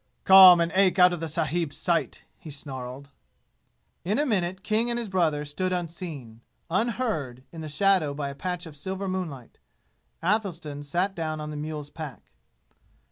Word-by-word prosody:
"Come 190 -2 +10
and 170 0 +1
ache 190 -1 +3
out 180 -1 +6
of 175 - -4
the 165 - -3
sahibs' 160 0 -2
sight!" 170 -2 -1
he 160 - -11
snarled. 135 -1 -7 0.9
In 205 +6 0
a 295 - +2
minute 190 -6 -1
King 225 +2 +1
and 235 - 0
his 235 -3 -3
brother 160 -6 +1
stood 185 +6 -2
unseen, 165 -10 -5 0.3
unheard 190 - -1
in 165 - -8
the 155 - -6
shadow 155 -2 +2
by 140 -1 -3
a - - -6
patch 180 +4 -4
of 160 -3 -11
silver 190 +6 -4
moonlight. 170 -10 -5 0.6
Athelstan 170 -7 -1
sat 175 +7 -1
down 155 -3 -3
on 150 0 -5
the - - -6
mule's 150 -1 -5
pack. 140 - -9
170 Hz, 165 wpm, -26 LUFS, 145-190 Hz, 0.9 s, Come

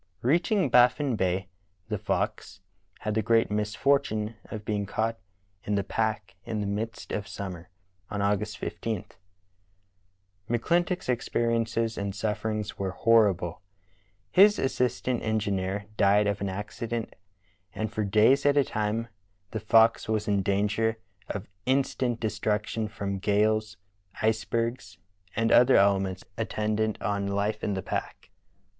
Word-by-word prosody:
Reaching 175 - +2
Baffin 125 +2 +4
Bay, 95 -1 0 0.4
theFox 95 - -2 0.4
had 105 - -2
the 110 - +1
great 115 0 +2
misfortune 105 +1 0
of 105 -2 -7
being 100 -1 -1
caught 115 +2 -1 0.4
in 105 - -1
the 100 - +1
pack 110 -3 -2
in 110 -1 -3
the 105 - -1
midst 105 +3 -4
of 105 -1 -3
summer, 90 -3 -7 0.4
on 100 - -3
August 105 +1 0
15. 110 +2 -4 1.4
McClintock's 175 +10 +1
experiences 115 -2 0
and 100 -1 -3
sufferings 105 0 -2
vv^ere 95 -1 -4
horrible. 95 -7 +3 0.7
His 205 +3 +6
assistant 125 -1 0
engineer 100 -2 -1
died 100 +1 +4
of 100 -1 -1
an 100 - -1
acci 105 +4 -5
dent, 115 -1 -3 0.6
and 110 0 -3
for 110 - -1
days 110 +7 +4
at 145 0 +4
a 140 - +6
time 110 0 -2 0.4
the 110 - -3
Fox 115 +1 +4
was 110 0 0
in 100 -1 +2
danger 105 +3 +1 0.3
of 100 - -4 0.2
instant 130 -2 +1
destruction 110 0 -1
from 100 -3 -4
gales, 105 +1 +1 0.4
icebergs, 110 -2 -1 0.4
and 115 0 +1
other 125 +2 +6
elements 95 -2 +3 0.2
attendant 110 -1 -1
on 100 -1 -1
life 100 +2 -1
in 100 - 0
the 95 - -3
pack. - - -5
110 Hz, 130 wpm, -27 LUFS, 100-115 Hz, 1.4 s, His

